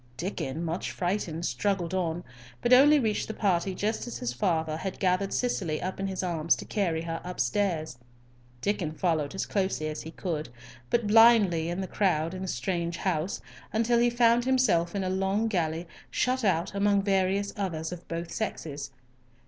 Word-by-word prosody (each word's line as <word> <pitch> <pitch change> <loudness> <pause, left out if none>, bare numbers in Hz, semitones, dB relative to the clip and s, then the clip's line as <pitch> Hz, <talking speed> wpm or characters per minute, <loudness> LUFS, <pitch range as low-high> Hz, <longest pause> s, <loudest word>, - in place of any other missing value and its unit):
Diccon, 165 -3 -3
much 170 +2 -2
frightened, 175 -3 -2
struggled 190 -4 -1
on, 175 -2 -1 0.4
but 240 - +3
only 290 +4 +8
reached 220 -5 0
the 220 - -5
party 190 -2 +1
just 215 +5 -2
as 240 - -5
his 120 0 -3
father 160 +3 0
had 190 +3 -4
gathered 190 +1 +1
Cicely 185 -11 -1
up 185 +1 -4
in 195 - -1
his 190 -1 -3
arms 165 -2 +2
to - - -8
carry 170 -6 -1
her 165 0 -4
upstairs. 160 -3 -1 0.6
Diccon 185 -6 -1
followed 160 -2 0
as 195 - -1
closely 190 -6 -1
as 155 - -5
he 160 - -8
could, 160 -4 -4 0.4
but 235 -2 +1
blindly 205 -7 +6
in 175 +2 -2
the 190 - -3
crowd 165 -5 +1
in 185 - -6
the 190 - -4
strange 170 +4 -2
house, 180 -1 -1 0.3
until 230 +2 +2
he 240 0 +4
found 240 0 +4
himself 210 -10 +2
in 195 - 0
a - - -1
long 195 +4 +1
gallery, 170 -4 -1 0.2
shut 255 0 0
out, 180 -4 +1
among 200 0 +2
various 195 0 +1
others 170 -6 -3
of 180 -1 -8
both 170 0 -4
sexes. 150 -10 -4
185 Hz, 175 wpm, -28 LUFS, 165-205 Hz, 0.6 s, only